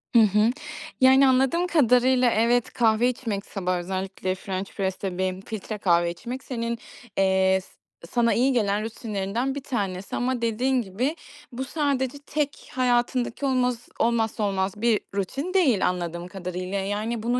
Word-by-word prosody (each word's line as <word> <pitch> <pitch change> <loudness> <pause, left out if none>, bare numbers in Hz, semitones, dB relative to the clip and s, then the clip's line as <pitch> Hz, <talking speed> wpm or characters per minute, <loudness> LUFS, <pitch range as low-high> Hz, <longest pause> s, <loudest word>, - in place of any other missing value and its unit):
Hı - - +9
hı. 210 +1 +4 0.5
Yani, 265 +1 +7
anladığım 265 +7 +3
kadarıyla 250 -5 +4
evet, 235 +2 +2
kahve 230 +1 +3
içmek 225 -5 -3
sabah 185 -2 -2
özellikle 185 +1 -3
french 190 0 -5
press'te 190 -1 -3
benim 185 0 -1
filtre 215 +1 -6
kahve 170 -3 +2
içmek 245 +9 -7
senin, 235 -2 -3 0.4
eee, 190 0 +3
s - - -18 0.4
sana 235 +3 +2
iyi 260 +3 +3
gelen 210 -3 +1
rutinlerinden 225 +3 -3
1 285 - -5
tanesi 195 -8 -3
ama 245 0 -1
dediğin 245 +3 +1
gibi 235 - -2 0.4
bu 250 +2 -4
sadece 275 -2 -1
tek 290 0 -3
hayatındaki 245 +1 +1
olmaz 250 -3 0
olmazsa 225 -2 +1
olmaz 195 0 -1
bir 230 -2 +3 0.2
rutin 275 - -2
değil 275 - +3
anladığım 175 -1 -3
kadarıyla. 185 +1 -4
Yani, 210 +4 -2
bunun 240 +2 +1
230 Hz, 145 wpm, -25 LUFS, 190-255 Hz, 0.5 s, Hı